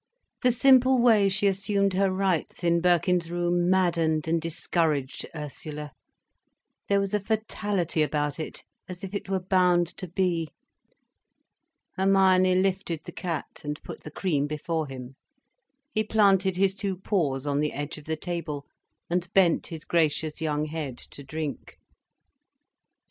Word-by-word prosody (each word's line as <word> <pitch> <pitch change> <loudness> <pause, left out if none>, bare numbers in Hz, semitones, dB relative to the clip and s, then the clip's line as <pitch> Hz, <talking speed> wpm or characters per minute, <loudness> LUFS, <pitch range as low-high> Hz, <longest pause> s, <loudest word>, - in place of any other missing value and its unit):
The 250 - +4
simple 260 +1 +5
way 220 -5 +5
she 195 +2 +1
assumed 200 0 +1
her 195 +1 +2
rights 185 -2 -1
in 170 0 +3
Birkin's 175 -1 +2
room 175 0 +1
maddened 165 -4 +2
and 165 0 +1
discouraged 160 -4 -1
Ursula. 150 0 -6 1.0
There 200 0 +3
was 195 0 -2
a 210 - +2
fatality 205 -5 -1
about 150 -1 -1
it, 155 - -6 0.3
as 180 +2 -8
if 195 0 -6
it 200 - -4
were 190 -1 +1
bound 180 -2 +3
to 185 - -6
be. 175 -3 0 1.5
Hermione 190 -1 +4
lifted 185 -3 0
the - - -7
cat 170 -4 -5
and 150 0 -4
put - - -8
the - - -8
cream 150 -3 -1
before 155 +1 -2
him. 130 0 -9 0.8
He 215 - +1
planted 195 -3 +3
his 190 +1 +2
two 195 -1 -3
paws 150 -9 -1
on 145 0 0
the 150 0 0
edge 145 +2 -5
of 150 - -16
the 160 0 -2
table 160 -4 -4 0.4
and 175 0 -2
bent 180 -4 +4
his 160 -2 -7
gracious 160 -1 0
young 150 -1 0
head 150 -5 -5
to 140 - -10
drink. 150 0 -6
175 Hz, 145 wpm, -26 LUFS, 155-195 Hz, 1.5 s, simple